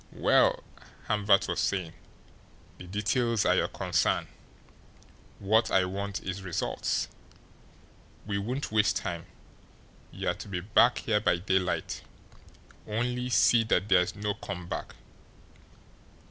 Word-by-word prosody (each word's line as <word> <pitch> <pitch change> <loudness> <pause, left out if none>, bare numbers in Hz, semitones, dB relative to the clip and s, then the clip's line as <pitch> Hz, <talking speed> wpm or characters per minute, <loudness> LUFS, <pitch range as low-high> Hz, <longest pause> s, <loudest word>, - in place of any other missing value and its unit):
"Well," - - +3 0.4
Hamvert 105 -2 +3
was - - -2
saying, 90 -5 -1 0.9
"the 90 - -9
details 110 +3 0
are - - +4
your - - +2
concern. - - 0 1.1
What 110 +4 +2
I 95 -1 +3
want 100 +1 -4
is 95 +1 -4
results. 90 -3 -2 1.2
We 100 -1 -2
won't 125 +7 -3
waste 105 -3 +3
time. 85 -3 -4 0.8
You're - - -2
to - - -10
be 95 -3 -3
back 115 +6 +4
here 110 -2 +1
by 105 - +2
daylight 90 -1 -1 0.9
only 125 +3 -2
see 120 -2 +4
that 105 -2 +1
there's 90 -1 +3
no 105 0 -2
come 90 -3 -7
back." - - -5
100 Hz, 120 wpm, -28 LUFS, 95-110 Hz, 1.2 s, are